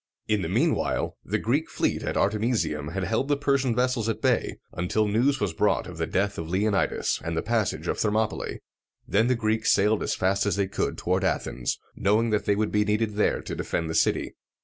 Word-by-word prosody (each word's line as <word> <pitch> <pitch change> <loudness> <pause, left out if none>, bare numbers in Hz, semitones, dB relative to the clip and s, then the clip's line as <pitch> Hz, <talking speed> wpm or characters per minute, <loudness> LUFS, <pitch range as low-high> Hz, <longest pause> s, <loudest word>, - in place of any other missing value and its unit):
In 105 -2 +1
the 80 - -3
mean 135 - +2
while - - -2
the - - -1
Greek - - 0
fleet - - -1
at - - -2
Artemisium 100 - 0
had 90 +4 -3
held 110 +8 0
the 145 -1 +2
Persian 140 -4 +1
vessels 125 -2 +1
at 110 - -2
bay, - - +1 0.2
until 95 +5 0
news 125 +7 +2
was 100 -7 -1
brought 105 +6 +1
of 90 -3 -9
the 80 - -1
death 100 +2 0
of 80 -1 -5
Leonidas, 100 +2 0
and 85 -1 -3
the - - 0
passage 115 -2 -1
of - - -1
Thermopylæ. 110 +1 0 0.5
Then 110 +4 +3
the 125 - +3
Greeks 110 -1 +1
sailed 105 +2 +3
as - - -1
fast 100 +2 +1
as 100 - +1
they 100 -1 +1
could 95 - -2
toward 95 +2 0
Athens, 65 -9 -1 0.2
knowing 110 +3 +2
that 105 - 0
they 100 - +2
would 105 +1 0
be 105 0 +3
needed 105 +1 0
there 105 - +1
to - - -5
defend 80 -1 -2
the - - -3
city. - - +1
105 Hz, 215 wpm, -26 LUFS, 95-115 Hz, 0.5 s, Then